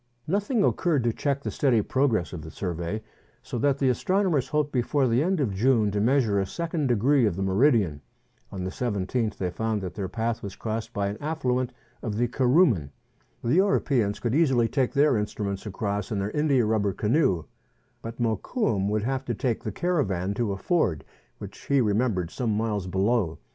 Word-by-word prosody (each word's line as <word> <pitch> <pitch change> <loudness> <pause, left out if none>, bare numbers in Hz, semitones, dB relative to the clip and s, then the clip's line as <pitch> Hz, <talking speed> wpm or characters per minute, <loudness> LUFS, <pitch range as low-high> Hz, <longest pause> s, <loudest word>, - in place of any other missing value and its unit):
Nothing 205 - +1
occurred 160 -10 +1
to 120 -1 +1
check 140 +1 -1
the - - -3
steady 120 -7 +2
progress 120 -10 0
of 85 - -5
the 80 - -9
survey, 90 +4 -4 0.4
so 120 - -4
that 140 +2 +2
the 135 -2 +2
astronomers 175 - +1
hoped 150 -1 0
before 130 +2 +1
the 120 +2 +2
end 185 +2 +1
of 125 -9 0
June 110 0 +2
to 100 0 0
measure 115 -4 +2
a 95 - 0
second 165 - -2
degree 125 +2 +3
of 95 - -1
the 95 - -2
meridian. 95 - +2 0.5
On 95 -2 -5
the 95 - -3
17th 110 0 -2
they 90 -2 -2
found 110 +2 -1
that 90 -2 -5
their 95 -1 -4
path 115 +2 -2
was 100 -2 -7
crossed 110 0 -4
by 100 -1 -1
an 105 - -6
affluent 130 -5 -1 0.3
of 105 -3 -3
the 120 +1 +2
Kuruman. 125 - +3 0.5
The 120 - +1
Europeans 135 - +2
could 120 -1 -1
easily 135 -7 +3
take 130 0 0
their 145 -1 +4
instruments 105 -1 -3
across 100 -1 -3
in 105 - -1
their 100 +2 -2
india 140 -4 +2
rubber 105 -2 +1
canoe; 105 - +1 0.6
but 115 +1 -8
Mokoum 110 - 0
would 105 0 0
have 135 +2 -1
to 120 - -2
take 120 0 -1
the 110 - -3
caravan 100 - -1
to 110 0 -1
a 100 - -3
ford 95 - 0 0.3
which - - -10
he 140 -1 +2
remem 110 0 +2
bered 90 -2 -3
some 115 -5 -1
miles 105 -4 -1
below. 95 -2 +1
115 Hz, 190 wpm, -26 LUFS, 100-135 Hz, 0.6 s, their